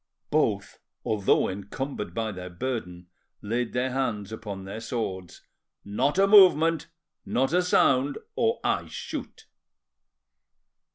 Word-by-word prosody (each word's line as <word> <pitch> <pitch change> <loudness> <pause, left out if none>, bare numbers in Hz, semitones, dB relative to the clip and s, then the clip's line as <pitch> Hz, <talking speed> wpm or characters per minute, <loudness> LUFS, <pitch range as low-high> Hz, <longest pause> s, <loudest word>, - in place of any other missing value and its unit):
Both, - - 0 0.3
although 105 -2 +2
encumbered 100 +1 -5
by 110 -1 -1
their 90 -2 -7
burden, 90 -3 -4 0.4
laid 115 +3 -2
their 125 +1 0
hands 115 -6 -2
upon 105 -3 -6
their 100 +3 -6
swords. 95 -7 -5 0.4
"Not 130 - 0
a 195 - +6
movement, 170 -6 +6 0.4
not 135 +5 0
a 180 - +4
sound, 140 -6 +3 0.2
or 230 0 +1
I - - 0
shoot." - - -7
115 Hz, 115 wpm, -26 LUFS, 100-140 Hz, 0.4 s, a